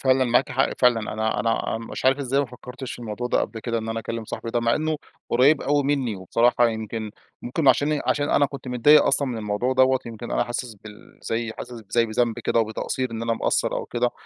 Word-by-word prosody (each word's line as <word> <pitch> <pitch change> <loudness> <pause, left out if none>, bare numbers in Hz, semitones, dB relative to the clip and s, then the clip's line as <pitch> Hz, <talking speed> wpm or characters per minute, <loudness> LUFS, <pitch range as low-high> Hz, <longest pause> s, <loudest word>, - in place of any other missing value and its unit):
فعلًا 130 -1 +3
معاكِ 120 +2 +2
حق، 135 - +2
فعلًا. 120 -3 +2
أنا 110 +1 -1
أنا 115 -1 -1
مش 115 - -7
عارف 135 +2 +4
إزاي 135 0 +1
ما 140 - -1
فكرتش 125 +1 -9
في - - -8
الموضوع 120 +1 -4
ده - - +1
قبل 110 - -4
كده، 115 0 -2
إن 110 - -5
أنا 115 0 -2
أكلم 115 0 -5
صاحبي 115 - -6
ده، 120 - 0
مع 115 0 +2
إنه 155 0 -1 0.3
قريب 135 +5 +4
أوي 145 +1 +2
مني. 135 -7 0
وبصراحة 120 +5 +2
يمكن 110 -1 -4 0.3
ممكن 135 +4 0
عشاني 145 +2 +3
عشان 145 0 +1
أنا 145 - +4
كنت 135 -1 -9
متضايق 135 +5 +6
أصلًا 140 0 +2
من 120 - -3
الموضوع 105 +4 -1
دوّة، 130 0 +4
يمكن 115 0 -7
أنا - - +1
حاسس 120 -1 -4
بال 105 +1 -15
زي 115 0 -2
حاسس 120 -1 -9
زي 115 +1 +2
بذنب 115 +1 0
كده 115 - +1
وبتقصّير، 115 +3 -2
إن 115 0 -5
أنا 115 - 0
مقصّر - - 0
أو - - -3
كده، 120 0 0
120 Hz, 225 wpm, -24 LUFS, 115-130 Hz, 0.3 s, متضايق